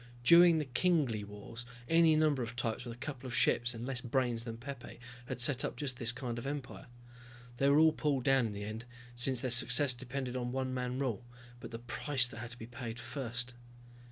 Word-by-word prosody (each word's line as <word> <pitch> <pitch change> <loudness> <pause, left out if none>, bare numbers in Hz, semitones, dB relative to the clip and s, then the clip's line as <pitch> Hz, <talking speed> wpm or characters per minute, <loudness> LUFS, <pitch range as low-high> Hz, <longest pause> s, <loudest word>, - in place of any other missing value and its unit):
During 170 +3 +7
the 155 - -1
Kingly 130 - +1
Wars 105 +3 -9 0.2
any 165 -1 +5
number 155 -4 +2
of 120 0 -5
types 120 0 -2
with 120 -1 -6
a - - -19
couple 135 0 -6
of 120 - -4
ships 120 +1 +2
and 115 +1 -6
less 130 -2 -2
brains 120 -2 0
than 115 -1 -6
Pepe 120 0 -9 0.3
had 125 -1 -4
set 125 +2 +4
up - - -3
just 135 -4 -3
this 120 -2 0
kind 120 -1 -5
of 120 - -6
empire. 140 -2 -6 0.7
They 140 +2 +3
were 140 - +5
all 160 0 +6
pulled 140 -4 0
down 135 -3 +3
in 105 - -6
the 100 0 -6
end, 110 +3 -6 0.3
since 120 0 +1
their 130 - -1
success 125 +3 +5
depended 130 +1 -5
on 125 -1 -2
one 130 0 -2
man 125 0 -2
rule. 125 -4 -2 0.4
But - - -8
the 115 - -6
price 125 +3 0
that 115 - -10
had 120 0 -6
to 120 - -10
be 115 - -8
paid 120 -1 -7
first! 125 -1 -4
125 Hz, 215 wpm, -33 LUFS, 120-135 Hz, 0.7 s, During